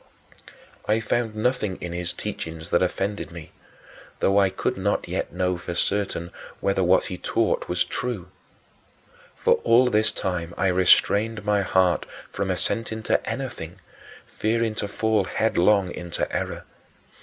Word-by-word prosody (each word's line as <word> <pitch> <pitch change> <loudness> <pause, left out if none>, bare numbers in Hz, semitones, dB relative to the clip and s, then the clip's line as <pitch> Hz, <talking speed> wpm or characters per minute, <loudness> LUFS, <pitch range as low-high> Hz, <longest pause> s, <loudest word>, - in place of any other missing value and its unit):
I 110 +1 +3
found 115 0 -1
nothing 110 -3 0
in 85 -1 -5
his 85 0 -2
teachings 80 0 -6
that 85 - +4
offended 100 +3 -1
me, 85 -2 -10 0.7
though 100 +1 +3
I 95 -1 +4
could 95 - -2
not 100 +2 -1
yet - - -3
know 90 -1 -1
for 85 0 -5
certain 95 -3 -1 0.3
whether 100 -1 +1
what 90 +1 +4
he 90 -4 -5
taught - - 0
was 90 0 +1
true. 110 -8 -4 1.1
For - - +3
all 125 +2 +5
this 110 0 +3
time 90 -2 -3
I 95 - +2
restrained 105 +4 +3
my 105 -1 +3
heart 95 -1 +2 0.2
from 95 0 -2
assenting 110 +4 -2
to - - 0
anything, 105 -11 -5 0.5
fearing 115 0 0
to 105 - -2
fall 110 0 +1
headlong 100 -2 +2
into 85 -1 -3
error. - - -3
95 Hz, 145 wpm, -24 LUFS, 90-110 Hz, 1.1 s, all